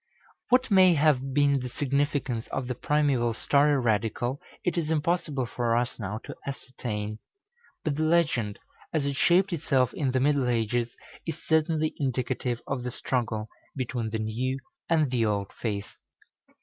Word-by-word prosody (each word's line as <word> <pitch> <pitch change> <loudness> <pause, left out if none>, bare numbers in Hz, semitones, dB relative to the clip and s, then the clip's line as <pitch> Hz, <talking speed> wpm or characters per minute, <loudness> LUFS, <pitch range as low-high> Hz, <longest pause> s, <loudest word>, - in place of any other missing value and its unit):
What 255 -1 +3
may 185 -3 +7
have 140 -3 +3
been 140 0 +3
the 125 0 -4
significance 140 -2 -1
of 135 - -3
the 125 - -2
primeval 130 -4 +1
story 145 +3 +3
radical 120 +3 0 0.2
it 180 - +1
is 165 -3 -1
impossible 160 -3 0
for 115 0 0
us 120 +1 -1
now 105 0 -3
to - - -8
ascertain; 110 -6 -4 0.6
but 150 -2 -1
the - - 0
legend, 155 -10 +2 0.3
as 155 -3 0
it 140 -1 -1
shaped 180 +6 +4
itself 135 -6 +1
in 140 -4 0
the 130 0 +1
middle 140 -2 +2
ages, 120 0 0 0.3
is 165 -1 -2
certainly 160 -1 +2
indicative 125 -2 -1
of 135 -2 -2
the 125 - -3
struggle 115 -3 -2 0.3
between 120 -4 -2
the 110 - -2
new 115 +5 -1 0.3
and 155 -5 +3
the 120 -3 +2
old 100 -2 -1
faith. 100 -3 -3
130 Hz, 155 wpm, -27 LUFS, 120-150 Hz, 0.6 s, may